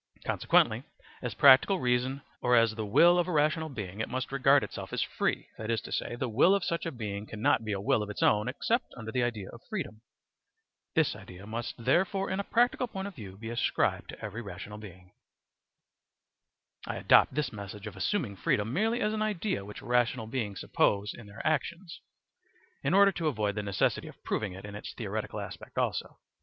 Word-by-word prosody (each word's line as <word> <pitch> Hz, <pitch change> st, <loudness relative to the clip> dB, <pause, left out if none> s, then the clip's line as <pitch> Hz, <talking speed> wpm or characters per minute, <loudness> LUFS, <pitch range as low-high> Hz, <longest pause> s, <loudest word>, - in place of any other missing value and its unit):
Consequently -, -, +3 dB, 0.4 s
as -, -, -4 dB
practical 140 Hz, +8 st, +7 dB
reason 125 Hz, +2 st, 0 dB, 0.2 s
or 125 Hz, 0 st, +4 dB
as 115 Hz, -2 st, +4 dB
the 110 Hz, -1 st, -4 dB
will 175 Hz, +12 st, +6 dB
of 175 Hz, -, +1 dB
a -, -, -2 dB
rational 155 Hz, +1 st, +2 dB
being 105 Hz, -7 st, -6 dB
it 110 Hz, -, -2 dB
must 130 Hz, +1 st, -3 dB
regard 135 Hz, +1 st, +4 dB
itself -, -, -6 dB
as -, -, 0 dB
free, -, -, -2 dB
that 110 Hz, 0 st, -5 dB
is 115 Hz, -1 st, +1 dB
to -, -, -10 dB
say, 120 Hz, -, -2 dB
the 125 Hz, -, -2 dB
will 135 Hz, -, +5 dB
of 200 Hz, -, -1 dB
such 170 Hz, -1 st, -1 dB
a -, -, -2 dB
being 105 Hz, -4 st, -5 dB
cannot 110 Hz, +1 st, +1 dB
be 110 Hz, -, -3 dB
a 100 Hz, -, -1 dB
will 105 Hz, +2 st, +2 dB
of 105 Hz, -, -4 dB
its 105 Hz, -, -3 dB
own 105 Hz, 0 st, +3 dB
except -, -, -1 dB
under 110 Hz, 0 st, -6 dB
the 125 Hz, -, 0 dB
idea 115 Hz, -5 st, -2 dB
of 120 Hz, -, -12 dB
freedom. 135 Hz, -, -4 dB, 0.9 s
This 160 Hz, -8 st, +3 dB
idea 95 Hz, -1 st, -11 dB
must 115 Hz, +2 st, -4 dB
therefore 190 Hz, -, +1 dB
in 190 Hz, -, -1 dB
a -, -, 0 dB
practical 245 Hz, +3 st, +2 dB
point 195 Hz, -3 st, -5 dB
of -, -, -14 dB
view 100 Hz, -, -10 dB
be 110 Hz, +2 st, -6 dB
ascribed 120 Hz, -, 0 dB
to -, -, -7 dB
every 105 Hz, +3 st, -5 dB
rational 100 Hz, +1 st, -8 dB
being. 90 Hz, -3 st, -12 dB, 0.9 s
* -, -, -25 dB
I -, -, -3 dB
adopt -, -, +5 dB
this 150 Hz, -4 st, -1 dB
method 100 Hz, 0 st, -8 dB
of 105 Hz, -2 st, -7 dB
assuming 100 Hz, -, -1 dB
freedom 105 Hz, +5 st, 0 dB
merely 225 Hz, -, +1 dB
as 210 Hz, -, +1 dB
an 215 Hz, -, -2 dB
idea 210 Hz, -, -1 dB
which 105 Hz, -, -9 dB
rational 120 Hz, -1 st, +1 dB
beings 110 Hz, -4 st, -3 dB
suppose 100 Hz, 0 st, +1 dB
in 115 Hz, -, -11 dB
their 100 Hz, +2 st, -9 dB
actions, 165 Hz, +3 st, -2 dB, 0.8 s
in 145 Hz, +7 st, +1 dB
order 200 Hz, 0 st, +7 dB
to 170 Hz, -4 st, -2 dB
avoid 105 Hz, -7 st, 0 dB
the 105 Hz, -, -2 dB
necessity 100 Hz, -3 st, 0 dB
of -, -, -13 dB
proving 105 Hz, -4 st, -2 dB
it 95 Hz, +2 st, -9 dB
in 105 Hz, -, -8 dB
its 105 Hz, -, -7 dB
theoretical -, -, -4 dB
aspect -, -, -8 dB
also. -, -, -1 dB
120 Hz, 205 wpm, -30 LUFS, 105-160 Hz, 0.9 s, practical